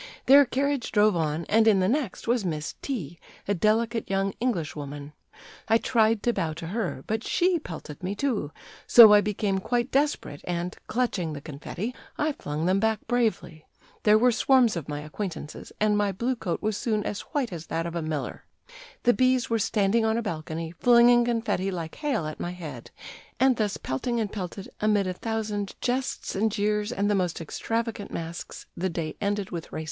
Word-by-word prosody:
Their 280 Hz, +1 st, +8 dB
carriage 275 Hz, 0 st, -1 dB
drove 210 Hz, -2 st, +4 dB
on, 160 Hz, 0 st, -1 dB
and 225 Hz, +1 st, +3 dB
in 205 Hz, -3 st, +5 dB
the 185 Hz, -, +2 dB
next 255 Hz, -3 st, -1 dB
was 240 Hz, -2 st, +2 dB
Miss 155 Hz, -4 st, -3 dB
T, 175 Hz, -, -4 dB, 0.3 s
a 200 Hz, -, +2 dB
delicate 220 Hz, +4 st, +1 dB
young 195 Hz, 0 st, 0 dB
English 195 Hz, -11 st, -1 dB
woman. 145 Hz, 0 st, -7 dB, 0.5 s
I 225 Hz, -, +5 dB
tried 225 Hz, -2 st, +2 dB
to 240 Hz, -, +2 dB
bow 160 Hz, -6 st, -1 dB
to 165 Hz, +2 st, -7 dB
her, 190 Hz, -, -3 dB
but 220 Hz, +1 st, -2 dB
she 355 Hz, -1 st, +2 dB
pelted 160 Hz, -, -9 dB
me, 185 Hz, +3 st, -3 dB
too; 215 Hz, -, -1 dB, 0.4 s
so 225 Hz, -3 st, +10 dB
I 205 Hz, -, +7 dB
became 205 Hz, -1 st, -1 dB
quite 240 Hz, +5 st, -1 dB
desperate, 275 Hz, -, 0 dB
and, 175 Hz, 0 st, -3 dB
clutching 210 Hz, -10 st, -1 dB
the 145 Hz, -, -5 dB
confetti, 165 Hz, -, -6 dB, 0.2 s
I 305 Hz, +1 st, +1 dB
flung 155 Hz, -, -4 dB
them 185 Hz, +2 st, +3 dB
back 220 Hz, 0 st, 0 dB
bravely. 225 Hz, -10 st, -1 dB, 0.3 s
There 210 Hz, 0 st, +5 dB
were 245 Hz, +3 st, +4 dB
swarms 245 Hz, -2 st, +4 dB
of 160 Hz, -4 st, -5 dB
my 145 Hz, 0 st, -3 dB
acquaintances, 155 Hz, 0 st, -6 dB
and 210 Hz, 0 st, +3 dB
my 205 Hz, -1 st, +1 dB
blue 240 Hz, +7 st, -1 dB
coat 185 Hz, -6 st, -3 dB
was 215 Hz, -1 st, 0 dB
soon 215 Hz, -2 st, -1 dB
as 205 Hz, -, -3 dB
white 270 Hz, -, -3 dB
as 165 Hz, -1 st, -7 dB
that 165 Hz, +1 st, -2 dB
of 170 Hz, 0 st, -5 dB
a 170 Hz, -, -1 dB
miller. 155 Hz, -2 st, -4 dB, 0.6 s
The 245 Hz, -, +5 dB
B 255 Hz, +1 st, +4 dB
s 250 Hz, -2 st, -3 dB
were 225 Hz, -, +2 dB
standing 210 Hz, +2 st, +2 dB
on 220 Hz, 0 st, +1 dB
a 235 Hz, -, -1 dB
balcony, 160 Hz, -2 st, -4 dB
flinging 240 Hz, 0 st, +6 dB
confetti 225 Hz, -5 st, 0 dB
like 170 Hz, -4 st, -5 dB
hail 275 Hz, -, -1 dB
at 155 Hz, 0 st, -6 dB
my 175 Hz, -, -3 dB
head; 170 Hz, -4 st, -8 dB, 0.5 s
and 260 Hz, -2 st, +4 dB
thus 210 Hz, -2 st, 0 dB
pelting 235 Hz, -, -2 dB
and 210 Hz, -3 st, -2 dB
pelted, 195 Hz, 0 st, -6 dB
amid 210 Hz, -2 st, +2 dB
a 185 Hz, -, -2 dB
thousand 210 Hz, -1 st, -3 dB
jests 255 Hz, +1 st, -2 dB
and 215 Hz, +3 st, +1 dB
jeers 210 Hz, +1 st, 0 dB
and 205 Hz, -4 st, 0 dB
the 205 Hz, -, +2 dB
most 180 Hz, -4 st, 0 dB
extravagant 225 Hz, +6 st, -3 dB
masks, 165 Hz, +1 st, -6 dB
the 185 Hz, +2 st, -1 dB
day 165 Hz, -2 st, -4 dB
ended 205 Hz, -1 st, -1 dB
with 170 Hz, -2 st, -6 dB
races." -, -, -4 dB
205 Hz, 195 wpm, -26 LUFS, 170-235 Hz, 0.6 s, so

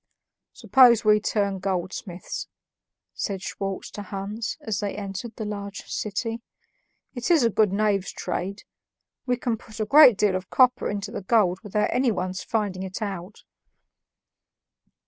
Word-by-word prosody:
"Suppose 245 Hz, -4 st, +5 dB
we 210 Hz, 0 st, +6 dB
turn 200 Hz, -2 st, -1 dB
goldsmiths," 185 Hz, 0 st, -4 dB, 0.7 s
said 195 Hz, -3 st, -4 dB
Schwartz 195 Hz, -1 st, -4 dB
to 205 Hz, -, -7 dB
Hans 205 Hz, +3 st, -5 dB
as 210 Hz, -3 st, -2 dB
they 205 Hz, -2 st, -3 dB
entered 205 Hz, +2 st, -6 dB
the 220 Hz, -, -5 dB
large 200 Hz, -1 st, -5 dB
city. 225 Hz, +2 st, -3 dB, 0.7 s
"It 245 Hz, +3 st, -3 dB
is 330 Hz, -6 st, +5 dB
a 230 Hz, -, +3 dB
good 210 Hz, -1 st, +3 dB
knave's 200 Hz, -1 st, +1 dB
trade; 195 Hz, +3 st, -4 dB, 0.6 s
we 250 Hz, -1 st, +1 dB
can 235 Hz, -2 st, -1 dB
put 220 Hz, 0 st, -13 dB
a 215 Hz, -, 0 dB
great 260 Hz, -2 st, +8 dB
deal 205 Hz, -2 st, +2 dB
of 185 Hz, 0 st, -4 dB
copper 250 Hz, -1 st, +3 dB
into 205 Hz, 0 st, -4 dB
the -, -, -5 dB
gold 190 Hz, -3 st, +2 dB
without 210 Hz, -1 st, -1 dB
anyone's 190 Hz, -7 st, 0 dB
finding 205 Hz, -5 st, -2 dB
it 190 Hz, -1 st, -5 dB
out." 195 Hz, -1 st, -6 dB
205 Hz, 145 wpm, -25 LUFS, 195-225 Hz, 0.7 s, great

